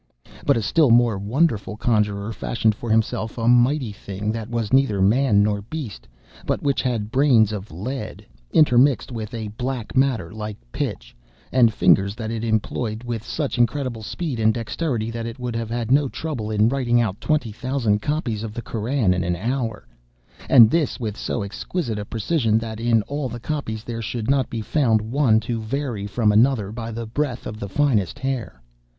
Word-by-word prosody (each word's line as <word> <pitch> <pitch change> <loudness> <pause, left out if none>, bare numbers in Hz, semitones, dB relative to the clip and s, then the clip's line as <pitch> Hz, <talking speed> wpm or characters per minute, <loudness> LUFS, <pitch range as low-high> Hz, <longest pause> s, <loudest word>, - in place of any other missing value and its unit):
(*23) - - -17
But - - +4
a 115 - -1
still 155 +4 +3
more 115 -3 +4
wonderful 110 -1 0
conjuror 105 -2 0
fashioned 110 0 0
for 115 +3 -7
himself 110 0 0
a 115 -1 -1
mighty 125 +1 +3
thing 100 +1 -4
that 115 0 -5
was 115 -2 -2
neither 135 -7 +3
man 105 +1 +4
nor 105 -1 0
beast, 115 - -7 0.4
but - - -2
which 140 -2 +1
had 115 -4 -2
brains 125 -5 +4
of 105 -1 -5
lead, 110 - -6 0.3
intermixed 135 -3 +4
with 110 -2 -5
a 110 -2 -4
black 125 +2 -4
matter 125 -10 +1
like 105 -1 -6
pitch, - - -4 0.4
and 120 -3 +5
fingers 100 -2 +3
that 110 -1 -4
it 115 -1 -3
employed 110 0 -1
with 120 -3 -4
such 145 -3 -3
incredible 120 -1 0
speed 135 +3 -4
and 110 0 +3
dexterity 115 -1 -2
that 115 0 -4
it 115 - -7
would 125 -2 -4
have 115 -1 -3
had 120 0 -2
no 140 0 +4
trouble 130 -10 -4
in 105 0 +3
writing 120 -2 +2
out 110 -4 -1
twenty 145 -8 0
thousand 115 -2 0
copies 135 -7 -2
of 110 -1 -6
the 120 - -3
Koran 115 -3 0
in 90 0 -1
an 90 0 0
hour, 115 +2 -3 0.6
and 115 -4 +8
this 165 -4 0
with 110 -4 -3
so 110 - -3
exquisite 110 - -3
a 105 - -5
precision, 115 0 +1
that 110 -1 -4
in 115 -2 +2
all 145 +2 -3
the 120 - -6
copies 115 -5 -4
there 115 -1 -5
should 115 +2 -2
not 135 -2 +1
be 115 - -4
found 115 -1 +2
one 115 +1 +2
to 115 -1 -3
vary 115 -3 -3
from 105 +1 +2
another 110 -2 +3
by 115 0 -5
the 115 +1 -5
breadth 125 +2 -3
of 105 - -6
the 100 - -5
finest 110 - +1
hair. 130 - -4
115 Hz, 190 wpm, -22 LUFS, 105-130 Hz, 0.6 s, and